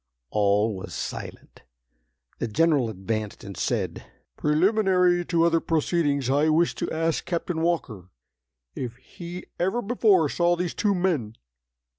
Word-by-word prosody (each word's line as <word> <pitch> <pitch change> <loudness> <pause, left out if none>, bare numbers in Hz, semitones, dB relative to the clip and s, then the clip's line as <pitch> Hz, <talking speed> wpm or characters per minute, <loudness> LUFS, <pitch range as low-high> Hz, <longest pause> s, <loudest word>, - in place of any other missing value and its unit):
All 105 +1 +2
was 95 - -7
silent. - - -7 0.8
The 120 - -1
General 140 +1 +2
advanced 110 +1 -4
and 100 -3 -8
said: - - -2 0.3
"Preliminary 180 +2 +3
to 165 -1 +2
other 165 -1 +3
proceedings, 150 -4 0
I 145 +4 +3
wish 165 +2 +3
to - - -3
ask 165 0 -1
Captain 170 -1 -2
Walker 125 - -2 0.6
if 120 -3 -5
he 175 +7 -9
ever 190 +7 +1
before 210 -7 +3
saw 175 +4 +2
these 175 -1 -2
two 205 -2 +1
men?" 160 - -1
165 Hz, 130 wpm, -25 LUFS, 120-175 Hz, 0.8 s, Preliminary